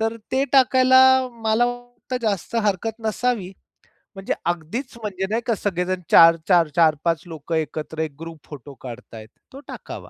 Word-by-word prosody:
तर 225 +1 -1 0.2
ते 265 +1 +2
टाकायला 260 -1 +5 0.4
मला 220 +2 +2
वाटतं 245 +1 -6
जास्त 200 0 -3
हरकत 210 +3 -2
नसावी. 220 -4 -1 0.6
म्हणजे 195 0 -3
अगदीच 175 - -4
म्हणजे 190 -3 -3
नाही 225 +2 -1
का 230 - 0
सगळेजण 185 -2 -2
4-4 165 +1 +5
4-5 160 -1 +2
लोकं 160 0 -5
एकत्र 155 0 -4
एक 160 -2 -2
ग्रुप 165 -1 -9
फोटो 145 -1 -11
काढतायेत, 115 -3 -10 0.2
तो 270 - -9
टाकावा. - - -9
185 Hz, 145 wpm, -22 LUFS, 160-230 Hz, 0.6 s, टाकायला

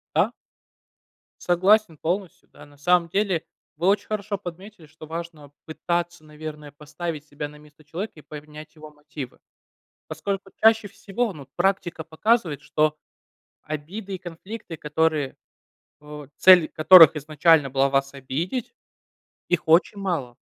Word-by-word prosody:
Да. - - +3 1.1
Согласен 185 0 +3
полностью, 180 +1 -3
да. 145 - -14
На 145 0 -20
самом 170 +3 +2
деле 190 -3 0 0.3
вы 175 - 0
очень 200 +1 +2
хорошо 210 -1 -3
подметили, 180 -1 -10
что 155 +1 -13
важно 160 -3 -7
пытаться, 170 +1 -3
наверное, 150 -1 -9
поставить 150 +1 -7
себя 145 0 -6
на 150 - -14
место 150 0 -20
человека 170 +8 -6
и - - -18
поменять 150 +1 -11
его 155 0 -12
мотивы. 150 -3 -9 0.7
Поскольку 195 -1 -4
чаще 220 -1 +5
всего, 200 +3 -3
ну, 155 - -11
вот 135 - -14
практика 175 -3 0
показывает, 165 0 0
что 155 0 0 0.7
обиды 185 +7 -6
и - - -14
конфликты, 175 +1 -9
которые, 150 -2 -1 0.7
э, 150 -1 -10
цель 180 -4 +7
которых 165 0 +8
изначально 150 0 +3
была 135 +1 +2
вас 135 0 0
обидеть 160 - -4 0.8
их 175 -3 0
очень 170 +5 +4
мало. 140 -11 -3
160 Hz, 135 wpm, -24 LUFS, 150-185 Hz, 1.1 s, которых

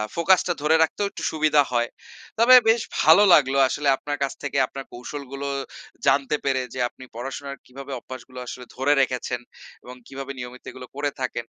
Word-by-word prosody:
Focus 170 +2 +4
টা 175 - +1
ধরে 155 +2 +3
রাখতেও 200 +5 -1
একটু - - -8
সুবিধা 155 -2 +3
হয়। 120 -1 +1 0.5
তবে 245 +3 +8
বেশ 225 +1 +4 0.2
ভালো 160 +7 +7
লাগলো 135 -3 +4
আসলে 145 +2 -2
আপনার 145 0 -4
কাছ 135 - -2
থেকে 145 -1 -3
আপনার 135 +1 -8
কৌশলগুলো 140 +2 -7 0.6
জানতে 140 +1 +3
পেরে 135 -1 +1
যে, 130 - -6
আপনি 130 - -15
পড়াশোনার 135 +3 -6
কিভাবে 135 +2 -10
অভ্যাসগুলো 130 +1 -10
আসলে 125 0 -8
ধরে 135 +3 +2
রেখেছেন 125 -1 -1 0.4
এবং 125 - -10
কীভাবে 135 0 -7
নিয়মিত 125 0 -8
এগুলো 130 -1 -10
করে 145 0 -1
থাকেন। 125 -2 -3
140 Hz, 170 wpm, -24 LUFS, 130-150 Hz, 0.6 s, তবে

